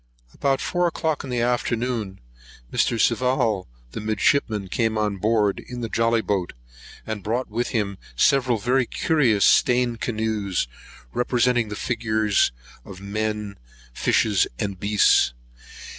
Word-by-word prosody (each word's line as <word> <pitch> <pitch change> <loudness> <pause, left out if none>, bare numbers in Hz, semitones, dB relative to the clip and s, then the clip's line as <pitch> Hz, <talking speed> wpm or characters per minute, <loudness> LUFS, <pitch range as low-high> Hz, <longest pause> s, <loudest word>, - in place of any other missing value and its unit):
About 135 -1 0
four 175 -1 +1
o'clock 160 -2 -2
in 135 - -7
the 120 -1 -1
afternoon, 120 -4 -1 0.5
Mr. 115 - +1
Sival 120 -5 +1 0.2
the - - -6
midshipman 110 -1 +1
came 110 +3 0
on 105 -2 0
board 105 0 +1
in 125 -1 -8
the 115 - -3
jolly 115 0 +2
boat, 95 -3 -2 0.5
and 110 -2 -4
brought 115 +4 -2
with 120 +3 -1
him 100 -4 -2 0.2
several 130 - +3
very 125 +3 +1
curious 120 - +2
stained 120 -2 +3
canoes, 110 - -1 0.5
representing 125 -2 +1
the 105 - -5
figure 110 -2 -1 0.6
of 95 -1 -11
men, 105 0 -3 0.3
fishes, 105 - +2
and 100 -2 -3
beasts. 100 - +3
110 Hz, 130 wpm, -23 LUFS, 105-125 Hz, 0.6 s, several